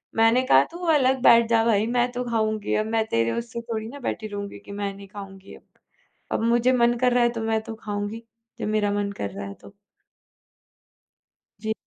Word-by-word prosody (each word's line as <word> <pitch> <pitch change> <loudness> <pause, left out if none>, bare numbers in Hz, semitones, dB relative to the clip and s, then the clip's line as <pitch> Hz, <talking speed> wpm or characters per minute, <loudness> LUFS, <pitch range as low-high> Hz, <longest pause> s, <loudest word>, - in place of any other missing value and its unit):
मैंने 225 +3 +4
कहा 135 +1 +6
तू 340 - -8 0.2
अलग 265 -3 +3
बैठ 235 -2 +7
जा 225 -1 +4
भाई, 220 -1 +2
मैं 245 +1 +1
तो 250 0 -3
खाऊँगी 220 -2 0
अब 215 - +1
मैं 220 0 0
तेरे 115 - +1
उससे 235 0 -4
थोड़ी 225 -2 -4
ना 280 +5 -9
बैठी 225 -4 -3
रहूँगी 200 -1 -6
कि 200 - -13
मैं 200 0 -3
नहीं 200 0 -12
खाऊँगी 195 -1 -11
अब, - - -18 0.7
अब - - 0
मुझे 240 +2 +3
मन 240 -1 +3
कर 250 0 +3
रहा 245 0 +3
है 240 - +3
तो 230 - -5
मैं 225 0 0
तो 225 - -7
खाऊँगी, 210 +1 -5 0.4
जब - - -2
मेरा 215 -1 +1
मन 205 0 -1
कर 100 - -4
रहा 100 0 -7
है 100 - -7
तो। 195 - -16 1.9
जी। 220 0 -1
220 Hz, 205 wpm, -24 LUFS, 205-235 Hz, 1.9 s, बैठ